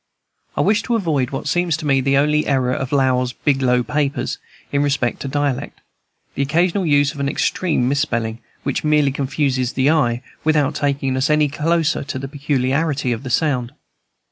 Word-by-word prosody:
I - - +3
wished 215 +2 +2
to 240 - 0
avoid 155 - 0
what 135 - -5
seems 175 -3 +1
to 155 - -7
me 135 -2 +3
the 135 +1 +2
only 150 +2 +2
error 130 -2 +1
of 130 0 -3
Lowell's 130 -3 +1
"Biglow 130 -3 +1
Papers" 145 -1 -2 0.3
in 140 - +1
respect 140 -4 0
to - - -5
dialect, 145 -2 -2 0.5
the - - -2
occasional 170 +6 +1
use 145 -2 +3
of 145 - -10
an 140 0 0
extreme 155 -3 0
misspelling, 120 -5 -1 0.2
which 140 - -2
merely 150 -2 +3
confuses 135 -2 -1
the 135 +3 +3
eye, 125 -6 +1 0.2
without 150 -3 +2
taking 140 -2 -1
us 130 +3 +1
any 150 -1 +3
closer 160 +2 0
to 140 -1 -5
the 135 +1 -5
peculiarity 140 0 0
of 125 +2 -4
sound. 125 -5 0
140 Hz, 170 wpm, -20 LUFS, 130-150 Hz, 0.5 s, I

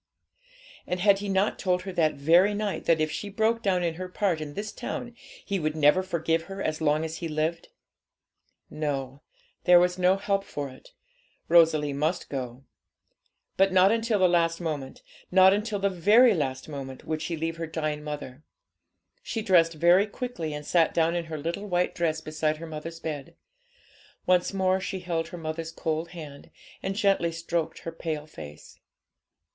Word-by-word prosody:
And 180 - -2
had 195 +1 +4
he 205 0 -4
not 195 +2 +1
told 180 -1 0
her 190 -1 -6
that 160 -3 +2
very 170 +8 +4
night, 205 -1 -3
that 165 -1 +3
if 155 0 0
she 205 +6 -5
broke 220 +3 +1
down 185 -5 +1
in 170 -1 0
her 185 +2 -6
part 180 -4 0
in 145 -1 -7
this 210 +1 -4
town, 240 -1 -5 0.3
he 200 -2 -1
would 155 -1 -1
never 150 +4 +4
forgive 165 -2 -1
her 195 0 -8
as 155 -4 -2
long 155 +1 +2
as 160 0 -5
he 170 - -4
lived? 160 +2 -2 1.0
No, 140 -3 -4 0.4
there 180 -1 +8
was 180 +1 +1
no 185 +1 +4
help 195 0 0
for 145 -7 -5
it; 130 - -16 0.6
Rosalie 160 -4 +4
must 155 +5 -1
go. 130 -1 -5 0.9
But 195 0 +4
not 185 +1 +5
until 225 -1 +1
the 185 -2 +5
last 165 -1 +2
moment 150 -6 -5 0.3
not 190 +1 +6
until 210 +1 -1
the 200 0 +1 0.2
very 235 +2 +7
last 135 -6 -2
moment 135 -3 -7
would 155 -1 -3
she 165 +1 -3
leave 165 +1 -3
her 165 -1 -4
dying 155 -2 -3
mother. 145 -2 -7 0.8
She 225 - -4
dressed 170 -5 +4
very 175 +6 +4
quickly, 205 -8 -5
and 150 0 -6
sat 165 -1 +2
down 165 +1 +2
in 170 -1 -2
her 160 -1 -5
little 170 +7 -4
white 180 -1 0
dress 160 -2 -1
beside 155 0 -1
her 165 - -8
mother's 165 +1 -7
bed. 150 -4 -6 0.9
Once 180 -1 +3
more 190 -1 +1
she 190 0 -4
held 165 -2 -2
her 175 - -8
mother's 160 0 -5
cold 160 0 -3
hand, 150 -5 -10 0.3
and 195 0 -3
gently 195 -5 +2
stroked 165 0 -3
her 165 - -5
pale 160 -2 -4
face. 75 - -12
165 Hz, 180 wpm, -27 LUFS, 155-190 Hz, 1.0 s, there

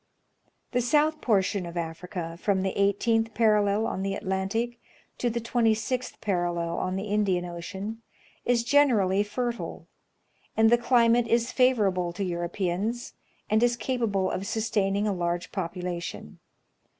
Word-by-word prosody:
The 245 - +1
soiith 300 +5 +2
portion 200 -3 +1
of 170 - -8
Afr'ca, 170 0 -5
from 190 -1 +1
the 190 - -1
18th 225 +3 +1
j)arallel 210 -1 +3
on 190 - -2
the 195 0 -1
Atlantic 200 +6 -2 0.4
to 245 - +1
the 235 +1 -2
26th 235 +1 0
parallel 175 -4 -1
on 185 0 -2
the 190 - -2
Indian 200 -4 +1
Ocean, 190 +6 -6 0.4
is 240 -1 +2
generally 235 -8 +4
fertile; 235 +3 -3 0.7
and 220 0 +5
the 240 - +7
climate 235 -1 +4
is 235 +2 +1
favorable 200 -9 +2
to 200 - -3
Europeans, 180 +6 -2 0.3
and 215 +1 +2
is 240 0 +3
capable 220 -6 0
of 195 - -3
sustaining 210 -2 0
a 205 - +1
large 175 0 -2
population. 175 - -5
205 Hz, 135 wpm, -27 LUFS, 185-235 Hz, 0.7 s, the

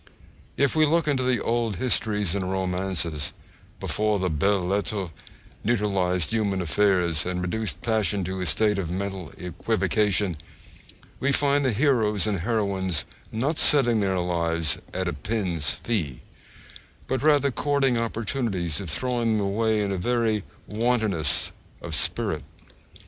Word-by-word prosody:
If 140 +1 +2
we 155 - +4
look 165 +1 +2
into 140 -3 +1
the 125 -1 +1
old 115 -3 0
histories 105 -4 0
and 95 -2 -2
romances, 90 -5 -2 0.5
before 105 -1 0
the 90 -2 -1
belles 95 +4 +1
lettres 100 -1 -1 0.5
neutralised 100 -6 0
human 105 -4 0
affairs 90 -1 +2
and 90 0 -2
reduced 105 +4 -2
passion 105 -4 +1
to 95 +1 -4
a 90 - -2
state 105 +3 +2
of 85 -4 -3
mental 95 -2 -4
equivocation, 95 +1 0 0.8
we 140 - +1
find 140 +1 +2
the 130 - +2
heroes 110 -5 +2
and 105 -3 0
heroines 95 -5 -1 0.3
not 135 +8 -1
setting 120 -6 +5
their 95 -2 +1
lives 85 -3 +1
'at 95 0 -2
a 85 - -1
pin's 85 -1 -1
fee,' 85 - -2 0.8
but 130 -2 -1
rather 145 -2 +4
courting 140 -1 +1
opportunities 115 - -2
of 95 - -6
throwing 120 +3 0
them 100 - 0
away 110 +2 +1
in 100 -1 -1
very 110 0 +1 0.2
wantonness 110 -7 +1 0.3
of - - -7
spirit. - - +2
100 Hz, 135 wpm, -25 LUFS, 90-115 Hz, 0.8 s, setting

